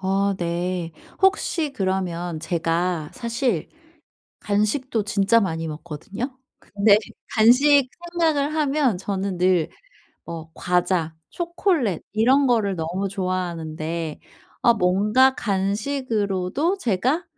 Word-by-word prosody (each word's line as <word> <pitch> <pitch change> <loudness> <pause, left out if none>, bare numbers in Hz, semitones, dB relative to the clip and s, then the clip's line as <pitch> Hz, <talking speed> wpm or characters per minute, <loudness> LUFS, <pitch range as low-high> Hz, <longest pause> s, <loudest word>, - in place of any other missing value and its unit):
어. 195 +1 +1
네. 175 0 -2 0.3
혹시 355 -6 +2
그러면 180 - -2
제가 165 -1 -1
사실 235 - -1 0.7
간식도 215 +3 0
진짜 210 +3 +3
많이 165 -4 -2
먹거든요. 175 - -6 0.2
근데 205 0 +3 0.4
간식 260 +5 +5 0.2
생각을 310 -4 +1
하면 285 - +1
저는 195 -1 -3
늘 180 -3 +3 0.6
뭐 165 -1 -7
과자, 180 -2 0 0.2
초콜릿 340 - 0
이런 260 +6 +4
거를 215 -6 +1
너무 175 +4 -2
좋아하는데 170 -4 -3 0.4
아 235 - +6
뭔가 210 +8 +3
간식으로도 210 - -1
제가 255 - 0
200 Hz, 210 characters per minute, -23 LUFS, 180-255 Hz, 0.7 s, 아